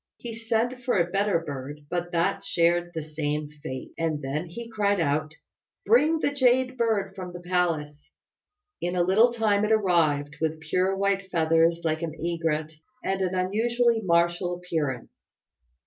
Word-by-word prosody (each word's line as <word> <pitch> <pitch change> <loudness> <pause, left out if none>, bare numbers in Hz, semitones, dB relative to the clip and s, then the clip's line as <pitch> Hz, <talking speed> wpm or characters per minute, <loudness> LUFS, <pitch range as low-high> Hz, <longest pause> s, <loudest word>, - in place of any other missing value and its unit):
He 235 -1 -7
sent 230 +2 -1
for 245 -4 +1
a 175 0 +1
better 200 -1 +2
bird, 145 -2 -6
but 175 +2 -3
that 170 -1 0
shared 175 +1 +2
the 160 - -3
same 150 -1 -3
fate; 130 -4 -6
and 160 -2 0
then 150 +5 -3
he 230 +8 -8
cried 205 -3 +1
out, 155 0 0 0.5
"Bring 285 +10 +4
the 300 - 0
Jade 260 -1 +3
Bird 220 -5 0
from 185 -2 -7
the 175 - -7
palace!" 170 -5 -1 0.7
In 175 +1 -1
a 175 - +3
little 215 +7 +5
time 215 -3 +1
it 215 - +1
arrived, 160 -8 +2
with 160 0 -1
pure 185 +4 0
white 195 -1 0
feathers 165 0 +2
like 160 -1 0
an 160 -2 -4
egret, 165 -2 -2 0.3
and 195 0 -1
an 185 0 0
unusually 230 +5 +1
martial 175 -1 +1
appearance. 160 -9 -4
175 Hz, 160 wpm, -26 LUFS, 160-210 Hz, 0.7 s, little